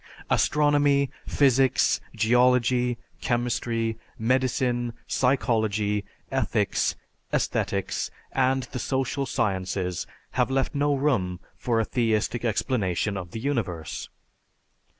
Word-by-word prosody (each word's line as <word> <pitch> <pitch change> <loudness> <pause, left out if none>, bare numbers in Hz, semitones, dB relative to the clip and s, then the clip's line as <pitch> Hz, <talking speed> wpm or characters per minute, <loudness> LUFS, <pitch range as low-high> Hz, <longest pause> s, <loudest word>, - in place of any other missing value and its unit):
Astronomy, 145 -2 +3 0.2
physics, 135 -2 +3
geology, 125 +2 +3 0.2
chemistry, 115 -2 -1 0.2
medicine, 125 0 +1
psychology, 110 -5 +1 0.3
ethics, - - +1 0.4
aesthetics, - - -1 0.2
and 130 0 +2
the 125 - -4
social 135 +2 -1
sciences 95 -4 -1 0.2
have 125 0 +1
left 135 0 0
no 145 0 +2
room 105 -11 0 0.2
for 115 -2 0
a 115 - +1
theistic 115 0 0
explanation 105 -4 0
of 90 -3 -5
the 110 - -6
universe. 95 - -3
120 Hz, 90 wpm, -26 LUFS, 110-130 Hz, 0.4 s, Astronomy